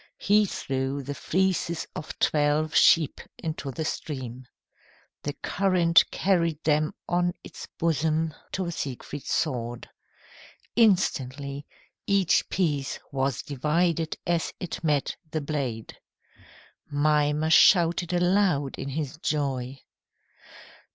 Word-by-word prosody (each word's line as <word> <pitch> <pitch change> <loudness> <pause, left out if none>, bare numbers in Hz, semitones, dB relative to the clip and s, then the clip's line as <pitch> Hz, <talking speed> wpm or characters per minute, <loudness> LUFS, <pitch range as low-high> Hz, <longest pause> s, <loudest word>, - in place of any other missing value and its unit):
He 210 +1 +3
threw 135 -3 -3
the 145 +2 -4
fleeces 180 +1 0
of 150 - -7
twelve 150 +1 +1
sheep 160 -4 +5 0.2
into 155 -3 -4
the 155 +4 -4
stream. 130 -5 -5 0.7
The 145 - -3
current 180 -3 +3
carried 170 -5 0
them 155 0 +1
on 175 0 +1
its - - -10
bosom 160 -1 0 0.2
to 185 -2 -2
Siegfried's 140 -1 -5
sword. 120 -1 -2 0.9
Instantly, 140 - +1 0.4
each 195 -3 +2
piece 145 -7 -1
was 135 -2 -1
divided 160 +4 0
as 170 -1 0
it 180 -2 -5
met 150 -3 +1
the 155 - -2
blade. 140 -7 -4 0.9
Mimer 150 +1 +2
shouted 170 +2 +5
aloud 175 -5 +1
in 140 - -4
his 145 0 -4
joy. 135 -3 -2
155 Hz, 105 wpm, -26 LUFS, 140-170 Hz, 0.9 s, sheep